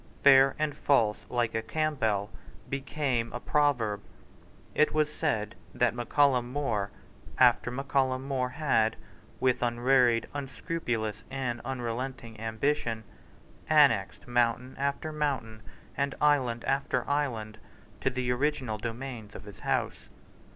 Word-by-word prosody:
"Fair 135 Hz, -1 st, +7 dB
and 155 Hz, -1 st, 0 dB
false 115 Hz, -9 st, +1 dB
like 120 Hz, -2 st, 0 dB
a 110 Hz, -, 0 dB
Campbell" 110 Hz, -6 st, -1 dB, 0.4 s
became 135 Hz, -4 st, -1 dB
a 120 Hz, -, -3 dB
proverb. 120 Hz, -9 st, +1 dB, 0.7 s
It 155 Hz, -, +3 dB
was 150 Hz, -1 st, +2 dB
said 110 Hz, -10 st, -1 dB, 0.2 s
that 120 Hz, -3 st, +2 dB
Mac 120 Hz, -1 st, -5 dB
Callum 130 Hz, -4 st, +3 dB
More 115 Hz, -8 st, -1 dB, 0.5 s
after -, -, +5 dB
Mac 135 Hz, +3 st, -5 dB
Callum 130 Hz, -1 st, +1 dB
More 130 Hz, -2 st, 0 dB
had, 130 Hz, -6 st, +1 dB, 0.4 s
with 130 Hz, -1 st, +2 dB
unwearied, 120 Hz, 0 st, +3 dB
unscrupulous, 125 Hz, -6 st, -3 dB
and 125 Hz, -3 st, -3 dB
unrelenting 120 Hz, -2 st, -4 dB
ambition, 115 Hz, 0 st, -1 dB, 0.7 s
annexed 140 Hz, -11 st, +4 dB
mountain 120 Hz, +1 st, +1 dB
after 140 Hz, +3 st, -1 dB
mountain 135 Hz, -8 st, -2 dB, 0.3 s
and 140 Hz, 0 st, -1 dB
island 130 Hz, -6 st, +2 dB
after 135 Hz, -2 st, 0 dB
island 115 Hz, -7 st, -2 dB, 0.4 s
to 135 Hz, -, +1 dB
the 125 Hz, -1 st, -1 dB
original 130 Hz, -4 st, -1 dB
domains 115 Hz, -2 st, -6 dB
of -, -, -8 dB
his 100 Hz, -2 st, -12 dB
House. -, -, -2 dB
125 Hz, 125 wpm, -29 LUFS, 115-140 Hz, 0.7 s, Fair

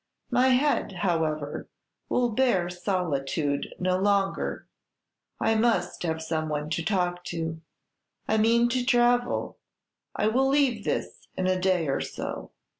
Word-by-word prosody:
My 250 Hz, +1 st, +4 dB
head, 260 Hz, -2 st, +2 dB
however, 160 Hz, -5 st, -1 dB, 0.4 s
will 245 Hz, -1 st, +2 dB
bear 210 Hz, -7 st, +1 dB
solitude 160 Hz, -6 st, -2 dB
no 185 Hz, 0 st, +1 dB
longer; 200 Hz, 0 st, 0 dB, 0.7 s
I 225 Hz, -, +2 dB
must 220 Hz, -5 st, +1 dB
have 160 Hz, -2 st, -2 dB
some 160 Hz, -1 st, -2 dB
one 150 Hz, 0 st, -3 dB
to 165 Hz, -, -1 dB
talk 180 Hz, -1 st, 0 dB
to. 165 Hz, -1 st, -4 dB, 0.7 s
I 220 Hz, -, +2 dB
mean 235 Hz, +2 st, +4 dB
to 250 Hz, +1 st, 0 dB
travel; 245 Hz, -1 st, +2 dB, 0.6 s
I -, -, 0 dB
will 260 Hz, +5 st, +2 dB
leave 270 Hz, -6 st, +2 dB
this -, -, -3 dB
in 185 Hz, -, 0 dB
a 185 Hz, 0 st, +2 dB
day 185 Hz, -4 st, +2 dB
or 135 Hz, -, 0 dB
so." -, -, -5 dB
185 Hz, 135 wpm, -27 LUFS, 160-240 Hz, 0.7 s, My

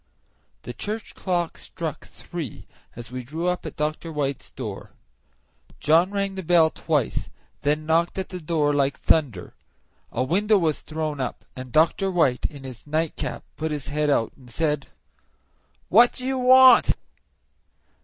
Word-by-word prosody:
The -, -, -6 dB
church 215 Hz, +1 st, -5 dB
clock 175 Hz, -3 st, -2 dB
struck 160 Hz, -4 st, -6 dB
three 165 Hz, -10 st, -7 dB, 0.3 s
as 120 Hz, 0 st, -9 dB
we 125 Hz, 0 st, -5 dB
drew 160 Hz, +8 st, -4 dB
up 180 Hz, -2 st, -3 dB
at 155 Hz, -, -8 dB
Dr. 155 Hz, +2 st, -3 dB
White's 140 Hz, -3 st, -3 dB
door. -, -, -7 dB, 0.9 s
John 165 Hz, +4 st, +4 dB
rang 200 Hz, -1 st, -1 dB
the 190 Hz, -, -5 dB
bell 165 Hz, -2 st, +4 dB
twice, 150 Hz, -8 st, -1 dB
and -, -, -20 dB, 0.3 s
then 150 Hz, +2 st, 0 dB
knocked 165 Hz, +3 st, +1 dB
at 190 Hz, -, -3 dB
the 180 Hz, -1 st, -7 dB
door 150 Hz, -2 st, +1 dB
like 140 Hz, -1 st, +1 dB
thunder. 130 Hz, -, +1 dB, 0.6 s
A 125 Hz, -, 0 dB
window 205 Hz, +9 st, +3 dB
was 160 Hz, -5 st, 0 dB
thrown 155 Hz, -2 st, -4 dB
up, 130 Hz, -2 st, -4 dB
and 130 Hz, -1 st, -8 dB
Dr. 165 Hz, -, +3 dB
White, 160 Hz, -9 st, +2 dB
in 140 Hz, -2 st, -12 dB
his 130 Hz, 0 st, -10 dB
nightcap, 155 Hz, +1 st, -2 dB
put 160 Hz, +1 st, -2 dB
his 150 Hz, -4 st, -4 dB
head 150 Hz, +1 st, 0 dB
out 115 Hz, -6 st, +2 dB
and 130 Hz, -3 st, -17 dB
said, 150 Hz, +1 st, -1 dB, 1.0 s
"What 235 Hz, +5 st, +6 dB
do 255 Hz, -, -4 dB
you 265 Hz, 0 st, 0 dB
want?" 255 Hz, 0 st, +7 dB
155 Hz, 155 wpm, -24 LUFS, 145-180 Hz, 1.0 s, want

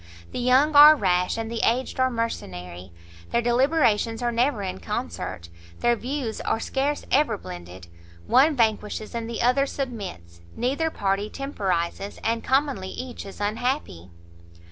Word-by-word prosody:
the -, -, -4 dB
young 260 Hz, +5 st, +3 dB
are 300 Hz, +2 st, +10 dB
rash, 180 Hz, -7 st, +1 dB
and 225 Hz, 0 st, -4 dB
the 230 Hz, -, -2 dB
aged 255 Hz, +3 st, 0 dB
are 260 Hz, 0 st, +3 dB
mercenary; 90 Hz, -, -5 dB, 0.4 s
their 235 Hz, -, +1 dB
deliberations 240 Hz, -2 st, +2 dB
are 240 Hz, -, +1 dB
never 235 Hz, -2 st, +1 dB
in 185 Hz, -, -4 dB
concert, 85 Hz, 0 st, -5 dB, 0.3 s
their 240 Hz, 0 st, +3 dB
views 250 Hz, -1 st, -4 dB
are -, -, -1 dB
scarce 280 Hz, +5 st, -1 dB
ever 260 Hz, -6 st, +3 dB
blended; 90 Hz, -, -10 dB, 0.4 s
one 290 Hz, -, +4 dB
vanquishes, 215 Hz, -2 st, 0 dB
and 230 Hz, -1 st, -4 dB
the 230 Hz, -, -2 dB
other 265 Hz, +3 st, +3 dB
submits; 190 Hz, -, -6 dB
neither 275 Hz, +7 st, 0 dB
party 200 Hz, -5 st, -1 dB
temporizes, 200 Hz, -9 st, -3 dB
and 230 Hz, 0 st, 0 dB
commonly 265 Hz, -8 st, 0 dB
each 250 Hz, -3 st, -7 dB
is 195 Hz, -, -11 dB
unhappy." 210 Hz, -, -2 dB
230 Hz, 145 wpm, -25 LUFS, 195-265 Hz, 0.4 s, are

